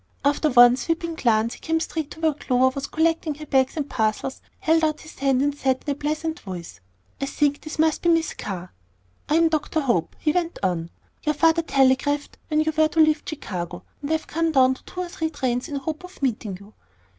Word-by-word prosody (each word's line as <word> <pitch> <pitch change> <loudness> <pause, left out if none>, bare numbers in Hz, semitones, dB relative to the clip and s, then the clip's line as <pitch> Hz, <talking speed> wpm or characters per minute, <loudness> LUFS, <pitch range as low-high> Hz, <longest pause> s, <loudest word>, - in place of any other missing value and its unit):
After 290 +2 +3
one 245 -1 +7
sweeping 330 +5 -2
glance, 230 -6 +1
he - - -12
came 325 0 0
straight 320 -2 -3
to 320 - -11
where 320 -1 +2
Clover 260 -2 +2
was 275 +1 -5
collecting 320 -1 0
her 305 +1 -9
bags 265 0 +2
and 290 -2 -1
parcels, 220 +1 -1 0.2
held 325 -3 +2
out 305 -1 +1
his 310 - -13
hand, 270 -1 +2
and 290 0 0
said 265 -2 0
in 290 - 0
a - - -1
pleasant 310 +3 -2
voice, 180 -4 -8 0.4
"I 275 - -1
think 290 0 +1
this 310 - -7
must 315 0 +2
be 345 - +2
Miss 330 -1 +2
Carr." 180 -2 -6 0.6
"I 300 - +3
am 330 0 +5
Dr. 315 0 0
Hope," 235 - 0
he 305 - +1
went 345 0 -1
on; 170 -3 0 0.3
"your 300 -1 0
father 330 +2 +4
telegraphed 275 0 +1
when 305 -1 +2
you 315 0 0
were 315 0 +4
to 320 - -2
leave 310 -1 +5
Chicago, 180 - -5 0.2
and 285 - -4
I - - +2
have 315 - -1
come 330 +1 0
down 260 -3 +5
to 260 - -14
two 365 - -6
or 360 - -3
three 320 -2 -2
trains 255 -4 -2
in 295 - -5
the 275 - -3
hope 315 +4 -4
of 360 -5 -12
meeting 215 -7 -1
you." 200 +2 -16
290 Hz, 225 wpm, -24 LUFS, 255-320 Hz, 0.6 s, one